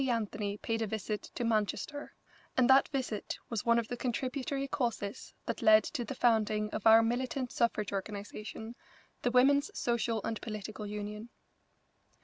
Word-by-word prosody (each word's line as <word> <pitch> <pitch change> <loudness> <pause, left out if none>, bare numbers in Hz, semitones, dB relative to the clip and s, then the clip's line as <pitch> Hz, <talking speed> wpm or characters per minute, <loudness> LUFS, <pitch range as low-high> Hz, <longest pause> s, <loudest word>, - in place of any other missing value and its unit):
Anthony 210 -3 -1
paid 225 +1 -2
a 220 - 0
visit 215 0 -3
to - - -2
Manchester, 230 +6 -1 0.4
and 255 -2 +5
that 265 +1 +6
visit 255 -7 -3
was 230 0 -2
one 235 0 +5
of 230 -1 0
the 245 - -3
contributory 260 +3 -2
causes 235 -7 -3
that - - -3
led 215 -1 +7
to 240 - -3
the 270 - -5
founding 215 -3 +2
of 220 - 0
our 225 +1 +8
militant 250 +2 -1
suffrage 215 -4 0
organisation, 210 +3 -5 0.5
the 245 - +1
Women's 280 +4 +4
Social 235 -1 0
and 225 -1 -3
Political 215 -1 -6
Union. 210 +2 -5
225 Hz, 150 wpm, -32 LUFS, 210-245 Hz, 0.5 s, our